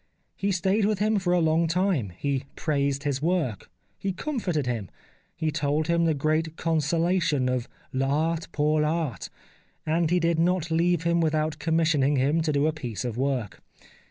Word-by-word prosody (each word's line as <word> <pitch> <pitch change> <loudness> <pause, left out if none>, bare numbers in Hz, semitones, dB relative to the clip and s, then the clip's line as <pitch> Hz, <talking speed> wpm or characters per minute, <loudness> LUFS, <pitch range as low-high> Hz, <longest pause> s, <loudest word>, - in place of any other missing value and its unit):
He 200 0 -1
stayed 195 +3 +1
with 210 0 +1
him 210 +1 +2
for 180 -2 -1
a 180 - +4
long 165 0 +2
time, 170 - +1
he 140 +1 -1
praised 140 -2 -1
his 140 -2 -1
work, 155 - -1 0.3
he 195 - -1
comforted 185 - -2
him, 115 -7 -3 0.5
he 160 -1 -1
told 150 +1 0
him 170 +1 +2
the 160 -2 +2
great 155 +3 0
consolation 165 -2 +1
of 125 -1 -1 0.2
V 130 - 0
Art 160 +4 0
pour 150 +1 +2
I' - - +1
Art, 155 - -2 0.6
and 160 +1 +1
he 180 +1 +3
did 165 -1 +1
not 170 -1 +1
leave 170 0 +2
him 170 0 +2
without 155 -1 0
commissioning 160 -3 +2
him 140 +5 +2
to 155 -1 0
do 145 0 +2
a 155 - +1
piece 125 -7 -5
of 120 -3 -3
work. 130 -4 -2
155 Hz, 180 wpm, -26 LUFS, 140-170 Hz, 0.6 s, a